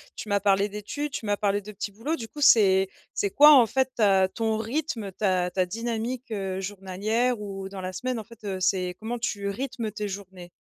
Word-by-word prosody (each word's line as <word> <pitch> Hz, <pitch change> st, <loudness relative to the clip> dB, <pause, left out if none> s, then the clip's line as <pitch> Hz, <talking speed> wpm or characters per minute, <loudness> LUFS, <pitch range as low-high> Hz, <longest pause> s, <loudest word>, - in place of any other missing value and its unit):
Tu 215 Hz, -, -7 dB
m'as 200 Hz, 0 st, +2 dB
parlé 200 Hz, 0 st, +2 dB
d'études, 210 Hz, +9 st, -5 dB
tu 235 Hz, -, -5 dB
m'as 205 Hz, -1 st, +1 dB
parlé 205 Hz, -1 st, +1 dB
de 210 Hz, +1 st, -10 dB
petits 210 Hz, 0 st, -5 dB
boulots. 235 Hz, +11 st, -3 dB
Du 225 Hz, -5 st, -7 dB
coup, 295 Hz, -, -10 dB
c'est 195 Hz, -8 st, +5 dB, 0.2 s
c'est 200 Hz, -2 st, -1 dB
quoi 295 Hz, +2 st, +8 dB
en 250 Hz, -4 st, +8 dB
fait 265 Hz, +1 st, 0 dB
ta 195 Hz, -4 st, +4 dB
ton 220 Hz, +1 st, -1 dB
rythme, 230 Hz, -2 st, -3 dB
ta 185 Hz, -2 st, 0 dB
ta 185 Hz, -1 st, +1 dB
dynamique, 230 Hz, +4 st, -4 dB
heu, 195 Hz, -2 st, -3 dB
journalière 205 Hz, +5 st, -1 dB
ou 195 Hz, -2 st, -6 dB
dans 195 Hz, -1 st, -7 dB
la 185 Hz, -, -4 dB
semaine 250 Hz, +6 st, -3 dB
en 220 Hz, -, -6 dB
fait, 230 Hz, +2 st, -16 dB
heu, 190 Hz, -2 st, -3 dB
c'est 180 Hz, -1 st, +1 dB
comment 235 Hz, +2 st, -3 dB
tu 205 Hz, -3 st, -2 dB
rythmes 235 Hz, 0 st, -4 dB
tes 210 Hz, 0 st, -4 dB
journées? 190 Hz, -3 st, -8 dB
205 Hz, 215 wpm, -26 LUFS, 195-230 Hz, 0.2 s, quoi